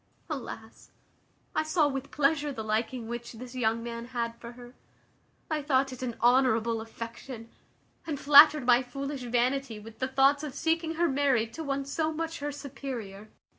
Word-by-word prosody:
Alas! 235 -5 -7 0.7
I - - +3
saw 310 0 +2
with 270 -1 -4
pleasure 295 0 +1
the 225 -5 -5
liking 225 +2 -2
which 235 +1 -6
this 245 +2 -9
young 230 -2 0
man 235 0 -5
had 235 -2 -3
for 235 0 -8
her. 245 0 -13 0.7
I 310 -2 -1
thought 270 -2 +1
it 255 - -10
an 245 -3 -3
honourable 235 -2 +3
affection; 230 +1 -8 0.6
and 295 -4 -3
flattered 295 -1 +8
my 245 0 +5
foolish 275 +2 -5
vanity 245 0 0
with 220 +1 -13
the 260 - 0
thoughts 275 +2 +3
of 285 -3 -6
seeing 325 +1 0
her 340 +1 +2
married 265 -6 +1
to 325 - -5
one 275 -1 -2
so 310 +3 -1
much 325 +1 -4
her 290 +1 -3
superior. 245 -8 -7
260 Hz, 170 wpm, -29 LUFS, 235-285 Hz, 0.7 s, flattered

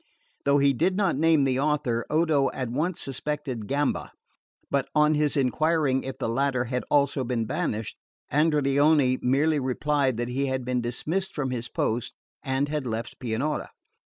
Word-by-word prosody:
Though 140 0 +4
he 140 0 +4
did 175 +8 +1
not 195 -7 +2
name 160 0 +3
the 130 -1 +1
author, 140 -5 0
Odo 155 -4 +2
at 130 -3 -3
once 160 +7 -1
suspected 135 -4 -4
Gamba; 145 0 -1 0.6
but 140 -1 0
on 150 0 +4
his 150 -1 +1
enquiring 140 0 +2
if 135 - -6
the - - -2
latter 130 +1 +1
had 125 +1 -2
also 140 -2 +2
been 120 -2 -1
banished, 110 0 -3 0.3
Andreoni 145 -2 +3
merely 145 +4 +2
replied 135 -1 0
that 120 +1 -2
he 135 +3 -1
had 130 -1 -2
been 125 -1 0
dismissed 160 +11 -2
from 135 -4 -2
his 120 -2 -4
post, 120 +1 -2 0.3
and 135 0 0
had 150 -3 -3
left 115 0 -4
Pianura. 130 +5 -2
140 Hz, 160 wpm, -26 LUFS, 125-150 Hz, 0.6 s, Though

